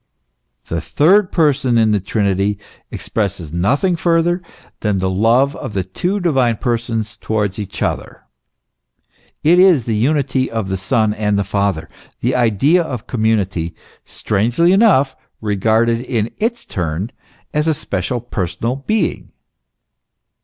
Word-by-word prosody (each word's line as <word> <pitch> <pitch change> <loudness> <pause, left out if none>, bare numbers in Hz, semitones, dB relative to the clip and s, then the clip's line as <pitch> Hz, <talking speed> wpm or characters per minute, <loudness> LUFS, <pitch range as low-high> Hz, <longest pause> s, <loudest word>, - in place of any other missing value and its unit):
The 85 -1 -2
third 180 - +3
person 145 -7 +2
in 110 -1 +3
the 105 - +2
Trinity 100 0 0 0.3
expresses 95 -7 -3
nothing 140 - +1
further 170 +1 +1 0.4
than 105 -2 0
the 95 0 0
love 115 +8 +3
of - - -6
the 95 -2 -1
two 180 - -2
divine 135 - +1
Persons 115 -2 -2
towards 105 -2 -2
each 105 - -4
other; - - -3 1.2
it 170 +4 +5
is 180 -9 +5
the 115 - -2
unity 135 +2 +1
of 110 -4 -3
the 95 - -1
Son 110 +2 +1
and 105 -1 0
the 100 - +1
Father, 100 -3 -1 0.3
the 125 - +1
idea 125 - +3
of 130 -8 -5
community, 100 -7 -1 0.3
strangely 120 - +1
enough 190 - +4 0.2
regarded 110 +3 +1
in 115 -4 -2
its 235 +2 -1
turn 90 +4 -3 0.4
as* 150 +1 0
a 160 - +3
special 110 - -3
personal 115 +2 -3
being. 215 +10 -2
115 Hz, 130 wpm, -18 LUFS, 100-145 Hz, 1.2 s, it